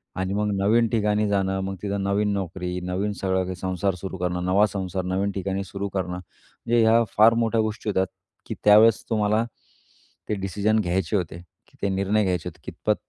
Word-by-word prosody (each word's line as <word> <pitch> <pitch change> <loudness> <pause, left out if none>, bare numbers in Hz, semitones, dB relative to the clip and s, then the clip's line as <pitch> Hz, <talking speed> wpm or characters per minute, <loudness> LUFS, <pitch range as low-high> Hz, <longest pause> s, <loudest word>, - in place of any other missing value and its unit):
आणि 95 +1 -2
मग 105 +1 0
नवीन 115 +4 +3
ठिकाणी 105 -1 +1
जाणं 95 -1 0
मग 95 0 -3
तिथं 100 -1 -2
नवीन 100 +1 +1
नोकरी, 90 -1 -3
नवीन 95 +3 -1
सगळं, 95 -1 +1
काही 90 0 -4
संसार 95 +1 -1
सुरू 95 +1 -6
करणं, 90 0 -2
नवा 95 +3 +4
संसार 95 -2 -3
नवीन 95 +2 0
ठिकाणी 95 0 -3
सुरू 100 +2 -4
करणं. 95 -2 -2
म्हणजे 115 +6 -3
ह्या 115 +1 +5
फार 110 +2 +7
मोठ्या 115 0 +1
गोष्टी 110 0 -3
होत्या, 95 -2 +2 0.4
की - - -4
त्यावेळेस 110 +2 +6
तुम्हाला 110 0 +2 0.9
ते - - +1
डिसिजन 105 +3 +1
घ्यायचे 95 0 0
होते. 85 -1 -5 0.2
की - - -26
ते 100 - +1
निर्णय 100 +2 +1
घ्यायचे 90 -2 -1
होते. - - -19
कितपत - - -1
100 Hz, 185 wpm, -24 LUFS, 95-105 Hz, 0.9 s, फार